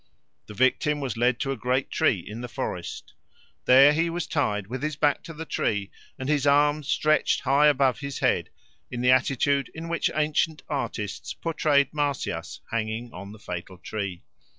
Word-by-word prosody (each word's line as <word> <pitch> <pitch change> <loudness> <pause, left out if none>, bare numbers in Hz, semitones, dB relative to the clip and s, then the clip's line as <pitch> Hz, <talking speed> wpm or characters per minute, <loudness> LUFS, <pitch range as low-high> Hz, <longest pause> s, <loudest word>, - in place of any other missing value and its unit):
The 105 - -10
victim 140 +5 +2
was 130 -5 -3
led 120 +1 +2
to 135 - -1
a - - -1
great 125 +3 -1
tree 155 - +2
in 110 +3 -7
the 125 - -5
forest; - - -5 0.5
there 135 +3 +7
he 165 +2 +1
was 170 -1 -3
tied 105 -11 -1
with 125 +5 -6
his 155 0 -2
back 145 -1 +2
to 165 - -8
the 160 +1 -6
tree 105 -8 -1 0.3
and 130 -1 -5
his 145 -1 +1
arms 145 +1 +3
stretched 155 0 +2
high 140 +2 +4
above 135 -3 +3
his 140 -1 -5
head, - - +1 0.4
in 120 -1 -4
the 125 +1 +5
attitude 135 +1 +2
in 165 +1 -6
which 170 - +1
ancient 155 +1 0
artists 115 -7 -4
portrayed 150 -4 +1
Marsyas 145 -2 -2
hanging 115 +1 -3
on 100 +2 -8
the 110 - -11
fatal 90 -2 -7
tree. 95 -1 -5
135 Hz, 175 wpm, -26 LUFS, 115-150 Hz, 0.5 s, there